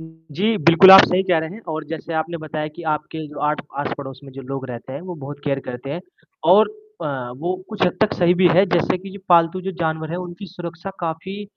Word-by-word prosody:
जी, 160 Hz, +6 st, -3 dB
बिल्कुल 170 Hz, +4 st, +7 dB
आप 190 Hz, -, +13 dB
सही 185 Hz, +1 st, +1 dB
कह 180 Hz, -3 st, +2 dB
रहे 160 Hz, 0 st, -4 dB
हैं 220 Hz, -, -10 dB
और 160 Hz, 0 st, -3 dB
जैसे 165 Hz, +1 st, -6 dB
आपने 160 Hz, +2 st, -2 dB
बताया 155 Hz, -1 st, -4 dB
कि 170 Hz, -, -9 dB
आपके 155 Hz, +1 st, -5 dB
जो 150 Hz, -, -10 dB
आठ 150 Hz, -, -1 dB, 0.2 s
आस-पड़ोस 135 Hz, -2 st, -5 dB
में 135 Hz, -, -11 dB
जो 135 Hz, +1 st, -9 dB
लोग 135 Hz, 0 st, -5 dB
रहते 125 Hz, +1 st, -8 dB
हैं 140 Hz, -, -6 dB
वो 180 Hz, 0 st, -7 dB
बहुत 145 Hz, -2 st, -8 dB
केयर 140 Hz, -2 st, 0 dB
करते 125 Hz, +2 st, -6 dB
हैं 165 Hz, +5 st, -4 dB, 0.5 s
और 215 Hz, +3 st, +6 dB, 0.3 s
अ, 130 Hz, -4 st, -4 dB
वो 175 Hz, +6 st, -2 dB
कुछ 215 Hz, -3 st, -6 dB
हद 180 Hz, -, -1 dB
तक 215 Hz, -, +2 dB
सही 175 Hz, 0 st, +3 dB
भी 185 Hz, 0 st, +5 dB
है 185 Hz, +3 st, +6 dB
जैसे 175 Hz, +1 st, +2 dB
कि 195 Hz, +2 st, -10 dB
जो 200 Hz, -, -10 dB
पालतू 170 Hz, +1 st, +4 dB
जो 190 Hz, +1 st, -4 dB
जानवर 160 Hz, -1 st, -2 dB
है 170 Hz, -, -3 dB
उनकी 180 Hz, +2 st, -7 dB
सुरक्षा 175 Hz, 0 st, -8 dB
काफ़ी 175 Hz, +4 st, -4 dB
165 Hz, 235 wpm, -21 LUFS, 150-180 Hz, 0.5 s, आप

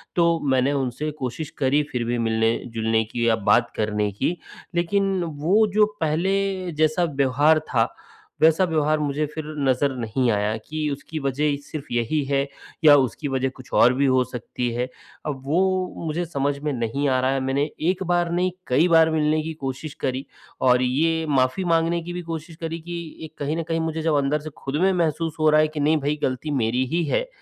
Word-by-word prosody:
तो 170 Hz, -1 st, +3 dB
मैंने 130 Hz, +2 st, +2 dB
उनसे 140 Hz, +2 st, -2 dB
कोशिश 135 Hz, +4 st, -4 dB
करी 140 Hz, +2 st, +2 dB
फिर 125 Hz, -2 st, -1 dB
भी 120 Hz, +1 st, -1 dB
मिलने-जुलने 115 Hz, 0 st, 0 dB
की 115 Hz, +2 st, -2 dB
या 115 Hz, -, +4 dB
बात 120 Hz, 0 st, +4 dB
करने 105 Hz, -1 st, 0 dB
की। 165 Hz, -, -1 dB, 0.4 s
लेकिन 195 Hz, +2 st, +1 dB
वो 170 Hz, +7 st, +2 dB
जो 210 Hz, 0 st, +5 dB, 0.2 s
पहले 185 Hz, +3 st, 0 dB
जैसा 155 Hz, +3 st, +1 dB
व्यवहार 145 Hz, +1 st, +3 dB
था 115 Hz, -3 st, +2 dB, 0.5 s
वैसा 160 Hz, +3 st, +5 dB
व्यवहार 155 Hz, -3 st, +1 dB
मुझे 150 Hz, +1 st, -1 dB
फिर 155 Hz, +1 st, -6 dB, 0.2 s
नज़र 135 Hz, +2 st, +2 dB
नहीं 120 Hz, +2 st, 0 dB
आया। 105 Hz, +1 st, 0 dB
कि 155 Hz, 0 st, -2 dB
उसकी 145 Hz, +3 st, -5 dB
वज़ह 145 Hz, +1 st, 0 dB
सिर्फ़ 155 Hz, -2 st, -6 dB
यही 120 Hz, +6 st, 0 dB
है 135 Hz, 0 st, +1 dB, 0.4 s
या 150 Hz, -2 st, +9 dB
उसकी 140 Hz, +2 st, 0 dB
वज़ह 135 Hz, -1 st, 0 dB
कुछ 130 Hz, -, -14 dB
और 125 Hz, +2 st, +6 dB
भी 140 Hz, +2 st, +1 dB
हो 130 Hz, -1 st, +3 dB
सकती 125 Hz, 0 st, -4 dB
है। 125 Hz, +2 st, -1 dB, 0.4 s
अब 140 Hz, -3 st, -4 dB
वो 160 Hz, +6 st, +2 dB, 0.4 s
मुझे 165 Hz, +3 st, -2 dB
समझ 140 Hz, -3 st, -1 dB
में 150 Hz, -, 0 dB
नहीं 120 Hz, +4 st, -1 dB
आ 130 Hz, -, +2 dB
रहा 130 Hz, +1 st, +2 dB
है। 135 Hz, -, 0 dB
मैंने 135 Hz, +3 st, 0 dB, 0.2 s
एक 185 Hz, +1 st, -1 dB
बार 175 Hz, -1 st, +1 dB
नहीं 180 Hz, +1 st, +1 dB, 0.2 s
कई 150 Hz, +8 st, +3 dB
बार 165 Hz, -1 st, +5 dB
मिलने 155 Hz, 0 st, +2 dB
की 160 Hz, -, -4 dB
कोशिश 140 Hz, +3 st, -4 dB
करी 130 Hz, +1 st, -2 dB, 0.4 s
और 125 Hz, 0 st, +5 dB
ये 160 Hz, +6 st, +1 dB
माफ़ी 130 Hz, +5 st, +2 dB
माँगने 165 Hz, +1 st, +1 dB
की 175 Hz, +1 st, -6 dB
भी 180 Hz, -, -4 dB
कोशिश 160 Hz, +1 st, -6 dB
करी 165 Hz, 0 st, -3 dB
कि 175 Hz, +1 st, -8 dB, 0.3 s
ये 160 Hz, -, -5 dB
कहीं 145 Hz, +3 st, -2 dB
न 165 Hz, -, -1 dB
कहीं 165 Hz, 0 st, -2 dB
मुझे 160 Hz, 0 st, -2 dB
जब 160 Hz, -2 st, +1 dB
अंदर 140 Hz, +2 st, +1 dB
से 155 Hz, +1 st, -7 dB, 0.2 s
ख़ुद 135 Hz, -, -2 dB
में 190 Hz, +1 st, +4 dB
महसूस 165 Hz, -2 st, 0 dB
हो 155 Hz, 0 st, +4 dB
रहा 155 Hz, 0 st, +5 dB
है 155 Hz, -, +3 dB
कि 155 Hz, 0 st, -6 dB
नहीं 150 Hz, +2 st, +3 dB
भाई 145 Hz, +2 st, 0 dB
गलती 130 Hz, +4 st, -1 dB
मेरी 125 Hz, +4 st, +1 dB
ही 170 Hz, -, +2 dB
है -, -, 0 dB
150 Hz, 200 wpm, -23 LUFS, 130-160 Hz, 0.5 s, या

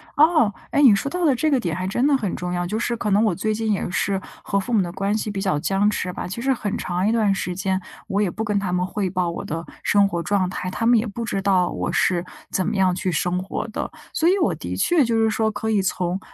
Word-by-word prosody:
哦， 305 Hz, -8 st, +4 dB, 0.2 s
哎， -, -, 0 dB
你 250 Hz, -7 st, +8 dB
说 275 Hz, +8 st, -2 dB
到 355 Hz, +1 st, -1 dB
了 285 Hz, -, +5 dB
这 310 Hz, +5 st, +1 dB
个 270 Hz, -3 st, +3 dB
点 170 Hz, -7 st, -2 dB
还 185 Hz, +1 st, -3 dB
真 240 Hz, +7 st, 0 dB
的 290 Hz, -, +4 dB
很 215 Hz, -8 st, -2 dB
重 180 Hz, 0 st, -4 dB
要， 175 Hz, 0 st, -1 dB
就 215 Hz, -, -2 dB
是 235 Hz, +1 st, -1 dB
可 210 Hz, -, -2 dB
能 205 Hz, +3 st, +4 dB
我 210 Hz, -5 st, +2 dB
最 215 Hz, +4 st, -1 dB
近 220 Hz, 0 st, -1 dB
也 195 Hz, -, -1 dB
是 190 Hz, +1 st, 0 dB, 0.2 s
和 200 Hz, -, 0 dB
父 245 Hz, +5 st, -5 dB
母 215 Hz, -4 st, +4 dB
的 175 Hz, -, -5 dB
关 200 Hz, +4 st, -1 dB
系 210 Hz, -1 st, -3 dB
比 195 Hz, -, -3 dB
较 185 Hz, -7 st, 0 dB
僵 195 Hz, +5 st, +2 dB
持 185 Hz, -3 st, -2 dB
吧。 -, -, -5 dB
其 190 Hz, +6 st, -6 dB
实 265 Hz, +2 st, +2 dB
很 210 Hz, -5 st, -3 dB
长 180 Hz, +2 st, -1 dB
一 -, -, +3 dB
段 215 Hz, -4 st, +2 dB
时 180 Hz, -2 st, -3 dB
间， 190 Hz, 0 st, -1 dB, 0.3 s
我 200 Hz, +2 st, 0 dB
也 200 Hz, -, +2 dB
不 220 Hz, +5 st, -4 dB
跟 205 Hz, -2 st, 0 dB
他 190 Hz, -3 st, -2 dB
们 180 Hz, 0 st, +1 dB
汇 190 Hz, 0 st, -2 dB
报 180 Hz, -1 st, -1 dB
我 -, -, -5 dB
的 165 Hz, +2 st, -4 dB, 0.2 s
生 200 Hz, -1 st, +4 dB
活 170 Hz, -3 st, -2 dB
状 190 Hz, +1 st, +1 dB
态， 185 Hz, 0 st, -4 dB
他 230 Hz, +4 st, -3 dB
们 235 Hz, -1 st, +5 dB
也 225 Hz, -, -2 dB
不 230 Hz, +3 st, -5 dB
知 195 Hz, -2 st, -2 dB
道 190 Hz, -2 st, +2 dB
我 -, -, -2 dB
是 175 Hz, -1 st, +1 dB, 0.3 s
怎 185 Hz, -1 st, 0 dB
么 220 Hz, -, -1 dB
样 190 Hz, -2 st, +3 dB
去 185 Hz, -1 st, -1 dB
生 180 Hz, +3 st, 0 dB
活 195 Hz, +4 st, -4 dB
的。 -, -, -4 dB, 0.2 s
所 330 Hz, -, +3 dB
以 385 Hz, -, +3 dB
我 340 Hz, -, +2 dB
的 -, -, -5 dB
确 345 Hz, -4 st, +3 dB
就 230 Hz, -2 st, +1 dB
是 225 Hz, 0 st, +3 dB
说 220 Hz, 0 st, +1 dB
可 215 Hz, +1 st, -3 dB
以 205 Hz, -2 st, +3 dB
从 180 Hz, 0 st, -1 dB
200 Hz, 305 characters per minute, -22 LUFS, 185-225 Hz, 0.3 s, 你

